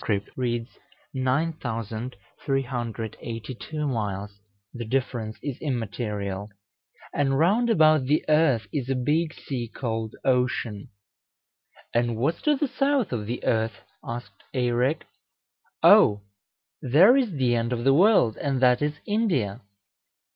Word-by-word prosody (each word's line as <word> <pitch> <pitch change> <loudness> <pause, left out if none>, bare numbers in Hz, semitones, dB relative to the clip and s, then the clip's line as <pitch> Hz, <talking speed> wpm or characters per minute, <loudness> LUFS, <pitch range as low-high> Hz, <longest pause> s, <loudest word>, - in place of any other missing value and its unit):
reads 120 -1 -3 0.3
9382 125 -1 -3
miles 105 -4 -3 0.3
the 120 - -5
difference 115 -2 -2
is 140 -4 -4
immaterial); 105 -6 -3 0.6
and 135 -2 +1
round 210 - +3
about 155 - +4
the 150 +4 +1
earth 150 -7 +3
is 135 -3 -2
a 135 - +1
big 150 +6 +1
sea 125 -6 -5
called 115 -3 -4
Ocean." 125 -5 0 1.0
"And 120 0 +1
what's 150 +8 0
to 300 -1 +3
the 290 +1 0
south 275 -2 0
of 110 -4 -3
the 120 +2 -4
earth?" 110 -2 0 0.2
asked 120 +1 -7
Eirek. 125 +4 +1 0.8
"O! 105 -1 +6 0.6
there 165 - +6
is 250 -8 +1
the 130 -4 +1
end 115 +1 -1
of 120 -1 -2
the 135 +1 +5
world, 170 - +4
and 135 -2 -1
that 125 0 +4
is 150 0 -1
India." 175 - 0
125 Hz, 120 wpm, -25 LUFS, 115-150 Hz, 1.0 s, O